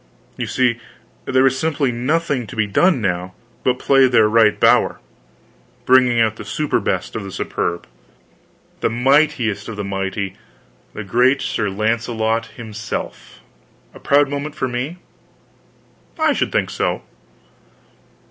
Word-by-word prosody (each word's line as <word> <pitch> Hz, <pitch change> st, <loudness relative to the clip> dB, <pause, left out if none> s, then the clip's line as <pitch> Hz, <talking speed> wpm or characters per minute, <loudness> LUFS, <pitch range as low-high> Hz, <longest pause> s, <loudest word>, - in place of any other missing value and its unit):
So -, -, -8 dB
you -, -, -2 dB
see 125 Hz, -3 st, +1 dB, 0.5 s
there 130 Hz, 0 st, +2 dB
was 130 Hz, 0 st, +2 dB
simply 150 Hz, -5 st, 0 dB
nothing 130 Hz, 0 st, -1 dB
to -, -, -9 dB
be 110 Hz, -1 st, +1 dB
done 145 Hz, -, +2 dB
now, 90 Hz, -2 st, -2 dB, 0.3 s
but 125 Hz, -1 st, +1 dB
play 135 Hz, 0 st, +4 dB
their 120 Hz, -4 st, +4 dB
right 110 Hz, -1 st, +3 dB
bower -, -, +3 dB, 0.9 s
bring 125 Hz, -2 st, +4 dB
out 110 Hz, -1 st, +2 dB
the -, -, -7 dB
superbest 105 Hz, -5 st, -2 dB
of 110 Hz, -, -3 dB
the 95 Hz, -, -7 dB
superb, 85 Hz, -1 st, -3 dB, 0.9 s
the -, -, +1 dB
mightiest 130 Hz, -2 st, +1 dB
of 115 Hz, -, -6 dB
the 105 Hz, -, -4 dB
mighty, 95 Hz, 0 st, -3 dB, 0.6 s
the 110 Hz, -, -6 dB
great 125 Hz, +7 st, +3 dB
Sir 105 Hz, -2 st, -1 dB
Launcelot 110 Hz, +2 st, -1 dB
himself! 115 Hz, -1 st, -7 dB, 0.5 s
A -, -, -13 dB
proud 145 Hz, 0 st, +3 dB
moment 145 Hz, +2 st, -5 dB
for 140 Hz, -4 st, -1 dB
me? 130 Hz, +7 st, -4 dB, 1.2 s
I 315 Hz, -2 st, +2 dB
should -, -, -1 dB
think -, -, 0 dB
so. -, -, -2 dB
120 Hz, 140 wpm, -19 LUFS, 105-135 Hz, 1.2 s, play